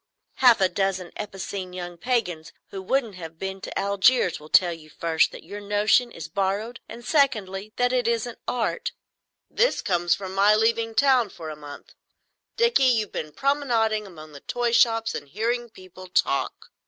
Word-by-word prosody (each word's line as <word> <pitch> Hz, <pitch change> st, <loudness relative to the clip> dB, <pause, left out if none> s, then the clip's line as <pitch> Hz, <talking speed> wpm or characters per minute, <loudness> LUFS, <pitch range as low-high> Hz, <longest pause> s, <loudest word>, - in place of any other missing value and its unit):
"Half 245 Hz, -4 st, +6 dB
a 190 Hz, -, +5 dB
dozen 190 Hz, -2 st, -2 dB
epicene 195 Hz, -2 st, -6 dB
young 175 Hz, -1 st, -6 dB
pagans 180 Hz, -8 st, -2 dB, 0.2 s
who 195 Hz, -, -6 dB
haven't 260 Hz, -6 st, +1 dB
even 165 Hz, -3 st, -8 dB
been 190 Hz, +3 st, -5 dB
to -, -, -6 dB
Algiers 200 Hz, +1 st, +3 dB
will 150 Hz, +1 st, -14 dB
tell 175 Hz, 0 st, +5 dB
you, 155 Hz, -2 st, -13 dB
first, 160 Hz, +1 st, +1 dB
that -, -, -11 dB
your 205 Hz, +5 st, -8 dB
notion 210 Hz, +4 st, +2 dB
is 165 Hz, -6 st, -8 dB
borrowed, 200 Hz, +6 st, -2 dB
and, 235 Hz, +1 st, -10 dB
secondly, 215 Hz, -, +1 dB
that 245 Hz, +1 st, +1 dB
it 245 Hz, -2 st, +1 dB
isn't 235 Hz, 0 st, -1 dB
Art. 240 Hz, -2 st, -2 dB, 0.6 s
"'This -, -, +1 dB
comes 175 Hz, -2 st, +1 dB
of 190 Hz, -2 st, -6 dB
my 200 Hz, +2 st, +4 dB
leaving 225 Hz, +1 st, +1 dB
town 255 Hz, -3 st, +4 dB
for 160 Hz, -4 st, -8 dB
a -, -, -7 dB
month. 145 Hz, -1 st, -11 dB, 0.6 s
Dickie, 470 Hz, -, +4 dB
you've 225 Hz, -5 st, +2 dB
been 155 Hz, -1 st, -5 dB
promenading 230 Hz, -, 0 dB
among 155 Hz, -4 st, -12 dB
the 145 Hz, -, -11 dB
toy 245 Hz, -, -2 dB
shops 225 Hz, -1 st, +3 dB
and 145 Hz, -, -6 dB
hearing 235 Hz, -, -2 dB
people 185 Hz, -2 st, -13 dB
talk." 140 Hz, -6 st, -1 dB
205 Hz, 170 wpm, -25 LUFS, 180-235 Hz, 0.6 s, Half